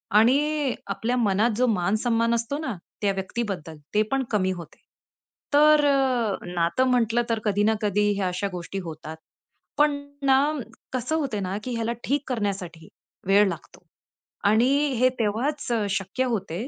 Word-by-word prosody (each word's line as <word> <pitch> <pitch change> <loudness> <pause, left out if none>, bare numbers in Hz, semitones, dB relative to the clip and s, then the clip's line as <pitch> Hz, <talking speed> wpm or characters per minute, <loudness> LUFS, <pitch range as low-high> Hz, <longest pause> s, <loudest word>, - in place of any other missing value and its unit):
आणि 280 +5 +3
आपल्या 240 +3 -1
मनात 215 0 +2
जो 255 - +3
मान 200 -2 +1
सन्मान 230 -1 +2
असतो 235 +5 -2
ना, 265 -8 -3 0.3
त्या 200 -1 +2
व्यक्तीबद्दल, 190 -5 -4 0.2
ते 210 - +4
पण 270 0 +1
कमी 190 -3 +1
होते. 175 -3 -8 0.7
तर 300 0 +6
अ, 255 -7 +2 0.2
नातं 175 +9 +1
म्हटलं 240 -1 +2
तर 230 -1 +1
कधी 205 -1 +2
ना 220 +1 +3
कधी 205 0 +2
ह्या 195 -2 0
अशा 180 +2 -2
गोष्टी 180 +2 -5
होतात. 160 -1 -8 0.6
पण 295 0 +5 0.3
ना, 265 -1 +5 0.6
कसं 255 +5 -1
होते 270 -9 -2
ना, 190 +1 -2
की 250 - -4
ह्याला 230 0 -1
ठीक 285 +2 0
करण्यासाठी 195 -8 -3 0.4
वेळ 200 +1 +5
लागतो 170 -2 -9 0.6
आणि 225 +4 +4 0.3
हे 255 - +5
तेव्हाच 245 +7 -1
अ, 220 -3 +1
शक्य 195 +6 -1
होते, 195 +2 -3
220 Hz, 155 wpm, -25 LUFS, 195-255 Hz, 0.7 s, तर